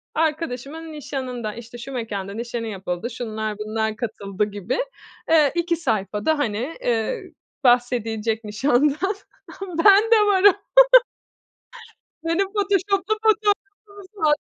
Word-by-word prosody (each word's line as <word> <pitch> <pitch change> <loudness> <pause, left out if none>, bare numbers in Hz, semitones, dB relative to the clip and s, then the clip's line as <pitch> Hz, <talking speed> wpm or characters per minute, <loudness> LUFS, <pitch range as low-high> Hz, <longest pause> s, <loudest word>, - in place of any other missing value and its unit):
arkadaşımın 315 0 -2
nişanından, 250 -6 -5
işte 235 +1 -10
şu 240 +3 -8
mekânda 200 -5 -4
nişanı 235 0 -4
yapıldı, 190 +1 -4
şunlar 220 -3 -4
bunlar 220 0 -2
katıldı 210 -3 -3
gibi, 205 +2 -4 0.5
eee, 305 -4 +5
2 340 0 +1
sayfada 220 - -1
hani, 245 +5 -2
eee, 225 -3 -1 0.4
bahsedilecek 230 -3 +1
nişandan 285 - +1 0.5
ama 370 -3 -6
ben 405 +1 +8
de 455 - +8
varım 400 -1 +5 1.7
Benim 335 +4 +1
photoshoplu 400 0 +1
fotoğrafımız 420 -2 +2 0.5
var. 310 -4 +2
245 Hz, 105 wpm, -22 LUFS, 220-330 Hz, 1.7 s, ben